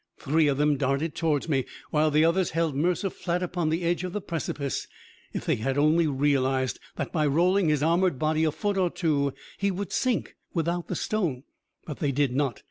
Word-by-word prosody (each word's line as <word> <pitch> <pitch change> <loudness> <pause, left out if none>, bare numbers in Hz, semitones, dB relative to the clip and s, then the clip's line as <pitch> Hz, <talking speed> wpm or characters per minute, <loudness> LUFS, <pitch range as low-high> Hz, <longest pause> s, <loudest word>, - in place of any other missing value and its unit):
Three 155 +2 +2
of 140 -2 +1
them 150 0 +2
darted 140 +4 0
towards 155 -2 0
me, 135 -5 +1 0.3
while 155 0 +3
the 155 +1 +4
others 175 +2 +2
held 165 -4 +1
Mercer 180 +6 0
flat 175 0 -2
upon 175 -2 -1
the 165 +3 -1
edge 175 +1 0
of 180 -1 -4
the 210 - -1
precipice. 150 -6 -3 0.4
If - - -5
they - - +1
had 135 +5 -1
only 155 +3 +4
realized 135 -2 +1 0.2
that - - -4
by 155 -3 +1
rolling 175 +4 +3
his 150 -1 +1
armored 170 -1 +2
body 155 +2 +1
a 155 - +2
foot 205 +5 -2
or 180 -2 +2
two, 145 -6 0 0.3
he 200 - +1
would 195 0 -4
sink... 255 -3 0 0.2
without 170 +1 -1
the - - -3
stone.... 170 -12 -1 0.4
But 150 - -7
they 145 -3 +1
did 135 -2 +1
not. 135 -5 0
155 Hz, 205 wpm, -27 LUFS, 140-175 Hz, 0.4 s, the